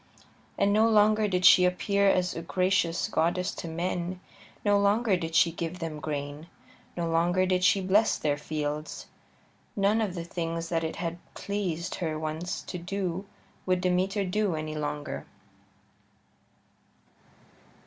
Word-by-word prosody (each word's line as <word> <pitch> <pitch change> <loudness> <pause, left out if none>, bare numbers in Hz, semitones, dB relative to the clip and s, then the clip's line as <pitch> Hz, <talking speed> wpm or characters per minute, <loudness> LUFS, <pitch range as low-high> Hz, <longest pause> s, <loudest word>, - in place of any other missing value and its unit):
And 200 0 +3
no 220 +2 +4
longer 215 0 +4
did 180 -2 0
she 180 - +8
appear 200 +2 +2
as 180 -1 +1
a 165 - -4
gracious 180 -1 +1
goddess 175 +3 0
to - - -6
men; 175 +2 -3 0.5
no 205 -1 +4
longer 205 +1 +3
did 165 -2 -4
she 165 - +5
give 165 +1 -4
them 165 -3 -5
grain; 145 +1 -5 0.5
no 170 -1 -1
longer 175 +3 +2
did 185 0 +1
she 195 +1 +4
bless 195 +4 +3
their 145 -2 0
fields. 150 +1 -4 0.7
None 205 +2 +2
of 200 -4 -2
the 170 - -4
things 165 -1 -4
that 165 -1 0
it 160 - -3
had 170 0 -4 0.2
pleased 180 -4 -3
her 160 -3 -1
once 155 +3 -4
to 180 - -6
do 190 +1 -3 0.4
would 185 0 +2
Demeter 185 +3 +1
do 195 -1 0
any 155 0 -4
longer. 150 -1 -4
180 Hz, 145 wpm, -28 LUFS, 165-195 Hz, 0.7 s, she